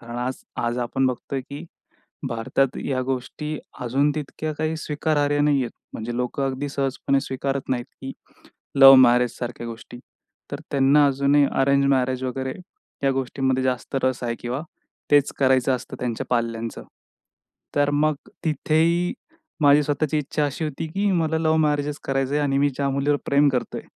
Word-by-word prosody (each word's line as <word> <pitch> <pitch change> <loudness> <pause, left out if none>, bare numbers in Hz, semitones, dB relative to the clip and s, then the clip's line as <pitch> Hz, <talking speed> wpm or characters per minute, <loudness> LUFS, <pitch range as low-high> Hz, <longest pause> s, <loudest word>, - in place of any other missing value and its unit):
कारण 120 0 -8
आज 130 +1 -2 0.3
आज 120 +1 -1
आपण 125 +2 0
बघतोय, 130 +2 -3
की 140 +4 -9 0.6
भारतात 120 +3 0
या 130 -2 -1
गोष्टी 135 +4 -4 0.3
अजून 140 +5 +2
तितक्या 155 +1 -4
काही 155 +1 -1
स्वीकारार्ह 145 -1 0
नाहीहेत, 140 -5 +2 0.2
म्हणजे 120 +2 -4
लोकं 125 +2 -2
अगदी 135 +2 -3
सहजपणे 135 0 0
स्वीकारत 135 +1 -3
नाहीत, 120 0 -1
की 135 - -6 0.7
लव्ह 135 0 +11
मॅरेजसारख्या 120 -1 +2
गोष्टी. 115 +1 -9 0.5
तर - - -4
त्यांना 140 +1 +4
अजूनही 140 +1 +3 0.2
अरेंज 140 +1 +3
मॅरेज 130 -1 0
वगैरे 130 +1 -3 0.5
या 135 - +4
गोष्टीमध्ये 130 0 -1
जास्त 130 +1 -2
रस 130 -1 0
आहे 120 0 -1
किंवा 125 +5 -3 0.5
तेच 145 -1 +4
करायचं 130 -1 +3
असतं - - -9
त्यांच्या 120 -3 -3
पाल्यांचं. 115 -1 -2 0.9
तर 145 0 +3
मग 150 +1 +2 0.3
तिथेही 165 - +1 0.5
माझी 145 0 +6
स्वताःची 150 +1 0
इच्छा 150 +1 -1
अशी 145 +3 -2
होती, 155 +2 -4
की 200 +5 0
मला 160 -2 +1
लव्ह 160 0 +2
मॅरेजचं 150 -1 0
करायचयं 135 +2 0
आणि 135 -1 +1
मी 145 0 +3
ज्या 140 +1 -2
मुलीवर 140 +2 +1
प्रेम 140 +1 +4
करतोय, 125 -2 -2
135 Hz, 150 wpm, -23 LUFS, 130-145 Hz, 0.9 s, लव्ह